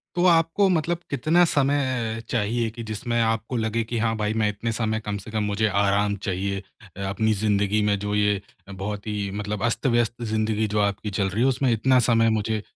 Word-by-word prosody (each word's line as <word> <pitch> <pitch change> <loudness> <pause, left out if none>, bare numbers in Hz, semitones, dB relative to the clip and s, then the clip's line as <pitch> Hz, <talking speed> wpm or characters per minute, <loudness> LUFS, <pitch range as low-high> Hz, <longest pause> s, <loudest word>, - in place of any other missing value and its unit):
तो 175 - +2
आपको 170 +3 +4
मतलब 170 -1 +1
कितना 155 +6 +3
समय 130 -7 0
चाहिए 115 +1 0
कि 115 +2 -8
जिसमें 115 +2 -2
आपको 115 +2 0
लगे 115 0 0
कि, 115 +1 -3
"हाँ 110 0 +1
भाई, 105 0 -1
मैं 110 -1 +2
इतने 105 +2 -3
समय 110 -1 -1
कम 105 -1 -4
से - - -9
कम 110 -1 -1
मुझे 105 +1 0
आराम 100 +1 +1
चाहिए 100 +1 -2 0.5
अपनी 110 +3 +1
ज़िंदगी 105 0 +2
में, 105 -1 +1
जो 105 +1 -3
ये 105 -1 +2 0.3
बहुत 100 +2 -5
ही 105 -2 -2
मतलब 105 +1 -4
अस्त-व्यस्त 120 -1 0
ज़िंदगी 110 -1 0
जो - - +3
आपकी 100 +1 -1
चल 100 0 0
रही 105 +5 -1
है, 130 - +4
उसमें 130 0 +1
इतना 130 +4 +3
समय 115 -1 +4
मुझे 110 0 -2
110 Hz, 195 wpm, -24 LUFS, 105-120 Hz, 0.5 s, आपको